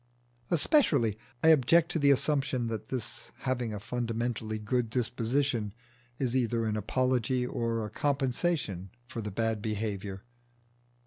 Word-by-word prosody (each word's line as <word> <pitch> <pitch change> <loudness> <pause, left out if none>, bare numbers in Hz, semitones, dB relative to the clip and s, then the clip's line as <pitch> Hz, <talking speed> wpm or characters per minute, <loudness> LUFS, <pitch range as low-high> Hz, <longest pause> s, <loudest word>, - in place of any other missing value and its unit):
Especially 145 - +3 0.3
I 160 - +7
object 160 +3 +5
to 165 - 0
the 140 -1 +4
assumption 140 -3 +2
that 110 -2 -5
his 120 -2 -5
having 125 -3 -1
a 105 - -4
fundamentally 115 -1 -2
good 115 +2 0
disposition 120 -1 0 0.4
is 130 -2 -1
either 120 -2 +1
an 110 -1 0
apology 125 +3 +1
or 115 -2 -1
a 105 - -7
compensation 135 - 0 0.2
for 120 -1 -6
his 105 -1 -4
bad 115 0 0
behaviour. 105 -2 -3
120 Hz, 130 wpm, -30 LUFS, 110-130 Hz, 0.4 s, I